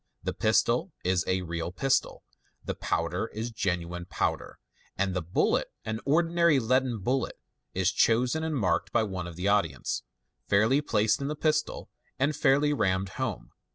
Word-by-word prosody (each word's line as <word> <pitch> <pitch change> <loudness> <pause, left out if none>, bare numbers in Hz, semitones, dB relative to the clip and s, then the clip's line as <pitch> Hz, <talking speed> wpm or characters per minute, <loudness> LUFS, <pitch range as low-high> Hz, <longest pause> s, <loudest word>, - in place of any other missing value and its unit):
The - - -2
pistol - - +2
is 90 -1 +1
k 95 0 0
real 85 0 -4
pistol, 135 +9 0 0.4
the - - -2
powder 85 +6 -1
is 115 +2 -3
genuine 90 -5 -2
powder, - - -2 0.4
and 95 -1 0
the 90 - -1
bullet 85 +2 +1
— - - -45
an 110 0 -3
ordinary 165 +1 +3
leaden 130 0 +1
bullet— 125 +6 -1 0.4
is - - +2
chosen 125 +7 +2
and 160 -1 -1
marked 90 -9 0
by 120 - +3
one 95 -4 -4
of 85 - -8
the 90 +3 -2
audience, 85 -10 0 0.5
fairly 110 +8 +3
placed 110 -4 +1
in 140 - -2
the 150 - -2
pistol, 155 0 0 0.3
and 145 +3 +1
fairly 145 +1 +3
rammed 95 -6 0
home. - - -4
110 Hz, 160 wpm, -28 LUFS, 90-135 Hz, 0.5 s, ordinary